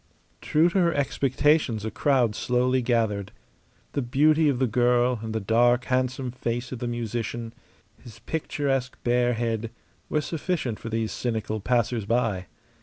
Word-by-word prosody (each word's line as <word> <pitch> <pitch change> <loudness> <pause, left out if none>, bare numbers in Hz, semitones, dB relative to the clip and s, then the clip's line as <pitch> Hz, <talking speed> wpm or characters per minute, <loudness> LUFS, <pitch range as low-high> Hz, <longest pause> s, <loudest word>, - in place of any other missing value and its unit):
True 155 +3 +3
to 190 - +1
her 170 -2 +3
expectations 135 -3 +1
a 110 - -3
crowd 125 -1 +2
slowly 125 +3 +1
gathered. 110 -5 0 0.6
The 140 - -1
beauty 150 +5 +3
of 135 - 0
the 130 - +2
girl 120 +1 +2
and 110 0 -5
the 110 - -1
dark, 120 +4 +3
handsome 130 0 -1
face 120 0 -3
of 130 - -5
the 120 - -3
musician, 115 0 -4 0.5
his 115 -3 -12
picturesque 135 -1 -2
bare 120 0 +2
head, 115 -1 -2 0.4
were 150 - +1
sufficient 155 - -2
for 115 - -6
these 115 -1 -1
cynical 110 -2 -2
passers 120 0 0
by. 110 -5 0
120 Hz, 150 wpm, -26 LUFS, 115-130 Hz, 0.6 s, True